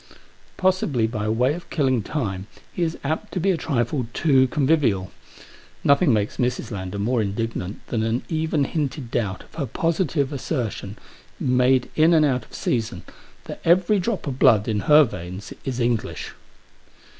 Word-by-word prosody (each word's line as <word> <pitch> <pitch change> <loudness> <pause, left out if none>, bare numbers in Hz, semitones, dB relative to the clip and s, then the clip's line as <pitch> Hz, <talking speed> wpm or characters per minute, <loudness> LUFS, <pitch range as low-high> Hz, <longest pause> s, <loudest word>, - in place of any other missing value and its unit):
Possibly 185 -11 +1
by 110 -2 -2
way 125 +5 +2
of 170 +1 -9
killing 130 -6 +1
time 100 -6 -3 0.3
he - - -4
is 165 -1 0
apt 160 +9 -2
to 185 - -1
be 195 +3 +2
a - - +1
trifle 125 -5 -1
too 135 -5 +4
convivial. 130 -9 +1 0.7
Nothing 140 +2 +4
makes 105 -2 0
Mrs. 125 -1 -1
Lander 95 -1 -5
more 115 +4 +1
indignant 105 -1 -3
than 115 - 0
an 115 +2 -1
even 160 -2 0
hinted 140 -4 -3
doubt 100 -5 -2
of - - -23
her 145 -4 -3
positive 155 - 0
assertion, 115 -7 -3 0.4
made 125 0 +2
in 160 +2 +5
and 155 -1 +5
out 125 -5 0
of - - -23
season, 115 -1 -2 0.4
that - - -8
every 185 +4 +4
drop 195 0 -2
of 135 -3 -4
blood 105 -2 +5
in 110 -2 0
her 150 +1 +9
veins 95 -4 -6
is 130 -2 -3
English. 120 -2 -1
130 Hz, 160 wpm, -23 LUFS, 110-155 Hz, 0.7 s, her